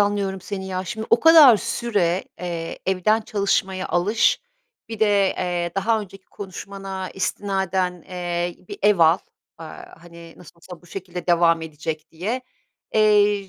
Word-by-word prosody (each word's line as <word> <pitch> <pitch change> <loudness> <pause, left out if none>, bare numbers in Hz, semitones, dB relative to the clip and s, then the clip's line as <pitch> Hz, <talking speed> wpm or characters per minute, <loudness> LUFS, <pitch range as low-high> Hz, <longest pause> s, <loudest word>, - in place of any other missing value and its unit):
anlıyorum 200 -2 0
seni, 190 0 -6
ya. 185 0 -3
Şimdi 220 +2 -5
o 235 - +5
kadar 315 -8 +8
süre, 195 -7 -1 0.2
eee, 170 -2 -5
evden 190 +4 +2
çalışmaya 195 -3 -1
alış, 205 +6 +2 0.5
bir 225 -2 -6
de, 205 -3 +3
eee, 175 -1 -1
daha 220 +3 +1
önceki 195 -2 -11
konuşmana 195 -1 -7
istinaden, 190 -3 -2
eee, 175 -1 -3
bir - - -7
ev 205 -3 +4
al, 165 +1 +5 0.4
aaa, 165 0 -11
hani, 170 -1 -13
nasıl 175 -1 -16
olsa 175 +1 -13
bu - - -18
şekilde 180 -1 -7
devam 170 -1 +3
edecek 155 0 -6
diye. 215 +10 -3 0.5
Eee, 205 -2 +3
190 Hz, 140 wpm, -22 LUFS, 175-205 Hz, 0.5 s, kadar